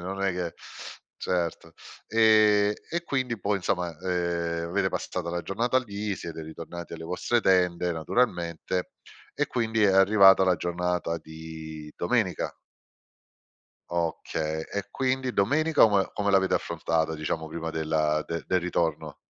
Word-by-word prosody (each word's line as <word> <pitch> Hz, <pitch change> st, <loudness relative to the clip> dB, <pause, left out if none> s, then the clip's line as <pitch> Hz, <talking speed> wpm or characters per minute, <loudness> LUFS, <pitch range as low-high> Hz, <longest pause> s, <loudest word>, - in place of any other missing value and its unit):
non 95 Hz, +2 st, -4 dB
è 95 Hz, -, +2 dB
che, 90 Hz, -2 st, -3 dB, 0.6 s
certo, 85 Hz, -2 st, -2 dB, 0.3 s
ehm, 110 Hz, -2 st, +5 dB, 0.2 s
e 170 Hz, +1 st, -1 dB
quindi 130 Hz, -7 st, -1 dB
poi 100 Hz, +1 st, +1 dB
insomma, 90 Hz, -1 st, -1 dB
ehm, 85 Hz, -2 st, -1 dB
avete 95 Hz, +2 st, +1 dB
passato 90 Hz, -2 st, -4 dB
la 85 Hz, 0 st, -2 dB
giornata 120 Hz, +5 st, +1 dB
lì, 105 Hz, -4 st, -3 dB
siete 85 Hz, -3 st, -7 dB
ritornati 85 Hz, +2 st, -8 dB
alle 80 Hz, -, -7 dB
vostre 90 Hz, +8 st, 0 dB
tende 90 Hz, -3 st, +2 dB
naturalmente 85 Hz, -1 st, -1 dB, 0.4 s
e -, -, 0 dB
quindi 110 Hz, -2 st, 0 dB
è 100 Hz, -, +6 dB
arrivata 95 Hz, 0 st, +7 dB
la 90 Hz, -1 st, +4 dB
giornata 85 Hz, -1 st, -2 dB
di 80 Hz, -1 st, -9 dB
domenica. -, -, 0 dB, 1.3 s
Okay, 80 Hz, -2 st, -2 dB
e 100 Hz, -1 st, -4 dB
quindi 130 Hz, -1 st, -1 dB
domenica 150 Hz, +10 st, +4 dB
ome 100 Hz, -3 st, +2 dB
come 100 Hz, -1 st, 0 dB
l'avete 95 Hz, -1 st, +3 dB
affrontata, 80 Hz, -1 st, -1 dB
diciamo 80 Hz, +1 st, -3 dB
prima 80 Hz, +1 st, -5 dB
della 80 Hz, -1 st, 0 dB
de 85 Hz, 0 st, -3 dB
del 90 Hz, -1 st, +1 dB
ritorno? 85 Hz, -3 st, -1 dB
90 Hz, 135 wpm, -27 LUFS, 85-100 Hz, 1.3 s, arrivata